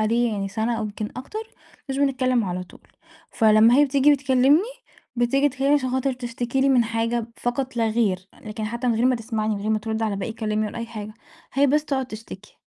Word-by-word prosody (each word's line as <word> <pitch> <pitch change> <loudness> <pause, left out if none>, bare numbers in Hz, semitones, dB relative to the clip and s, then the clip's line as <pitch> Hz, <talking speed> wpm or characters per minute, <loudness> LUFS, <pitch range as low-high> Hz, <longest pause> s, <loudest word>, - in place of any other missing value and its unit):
عليه 230 +1 +1
يعني 195 -1 -2
سَنة 225 +3 -1
أو - - -2
يمكن 210 0 -4
أكتر 275 +12 -6 0.5
مش 270 - -2
بنتكلّم 255 -4 +1
على 180 -1 -3
طول، - - -19 0.4
فلمّا 220 +1 +5
هي 290 - +6
بتيجي 280 +1 +4
بتكلّمني، 275 +4 +3 0.5
بتيجي 270 +4 +2
تكلّمني 270 +2 +1
عشان 260 -3 0
خاطر 260 +1 0
تشتكي 245 +1 -3
لي 275 - +3
من 250 -3 +4
حاجة 230 0 -1
فقط 255 +1 -3
لا 225 -1 +2
غير، 195 -5 0
لكن 215 0 -5
حتّى 235 +3 -2
من 235 - +2
غير 230 - +1
ما 255 -1 +3
تسمعني، 220 -2 -2
من 200 - -5
غير 215 - -1
ما 215 - +2
ترُد 220 +1 -3
على 215 -3 -1
باقي 200 +3 -4
كلامي 215 -1 -1
ولا 220 - -6
أي 230 - -4
حاجة، 215 -2 -8 0.4
هي 280 +2 +4
بس 300 +2 +2
تقعُد 265 -3 -1
تشتكي. 215 -3 -11
235 Hz, 215 wpm, -23 LUFS, 215-260 Hz, 0.5 s, هي